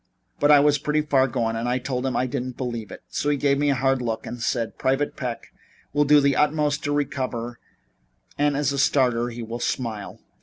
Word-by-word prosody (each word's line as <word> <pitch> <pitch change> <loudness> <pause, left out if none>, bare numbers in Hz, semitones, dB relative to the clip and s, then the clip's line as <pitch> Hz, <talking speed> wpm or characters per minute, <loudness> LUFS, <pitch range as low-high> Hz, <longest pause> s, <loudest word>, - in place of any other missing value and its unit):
But 145 - +3
I 145 -1 +8
was 145 0 +3
pretty 150 +2 0
far 135 -3 +3
gone 115 -2 -1
and 115 +2 -2
I 125 - +1
told 130 0 -3
him 130 - -2
I 125 - +1
didn't 130 -1 -4
believe 120 -5 -4
it, - - -10
so 145 - -2
he 145 - +2
gave 140 0 +2
me 145 0 +2
a 140 - +2
hard 135 0 +1
look 115 -2 -3
and 120 - -7
said: 115 -1 -2
'Private 135 +2 0
Peck 125 -3 -6 0.4
will 145 0 +3
do 150 +1 +6
his 140 -1 +3
utmost 150 -1 +1
to 145 - 0
recover 130 -5 -2 0.8
and 145 -1 +1
as 145 -1 +1
a 140 - -2
starter 125 -4 +2
he 120 0 -7
will 115 +2 -6
smile.' 115 -4 -3
130 Hz, 220 wpm, -24 LUFS, 120-145 Hz, 0.8 s, I